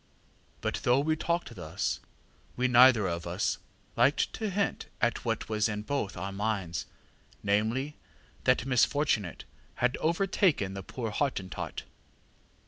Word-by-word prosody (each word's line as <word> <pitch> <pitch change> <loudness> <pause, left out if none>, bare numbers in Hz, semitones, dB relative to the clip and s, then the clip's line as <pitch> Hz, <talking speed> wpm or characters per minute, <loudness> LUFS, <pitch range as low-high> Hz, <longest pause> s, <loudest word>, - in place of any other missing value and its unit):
ŌĆÖ - - +1
ŌĆ£But - - -4
though 125 +2 +4
we 155 +2 +1
talked 170 -4 -1
thus, 85 -6 -2 0.6
we 125 +1 +2
neither 125 -3 +7
of 85 0 -3
us 90 +4 -1 0.4
liked 140 - +3
to 220 -2 -2
hint 200 +1 -1
at 120 -1 +1
what 115 -2 -1
was 110 0 +1
in 105 0 -3
both 110 -6 -2
our 95 +3 -3
minds, 95 -5 -2 0.6
namely, 110 +9 0 0.5
that 125 -2 +3
misfortunate 125 - +1 0.3
had 125 +1 +1
overtaken 165 - +2
the 95 - -5
poor 115 +3 -5
Hottentot. 105 -7 -2
115 Hz, 135 wpm, -30 LUFS, 100-140 Hz, 0.6 s, neither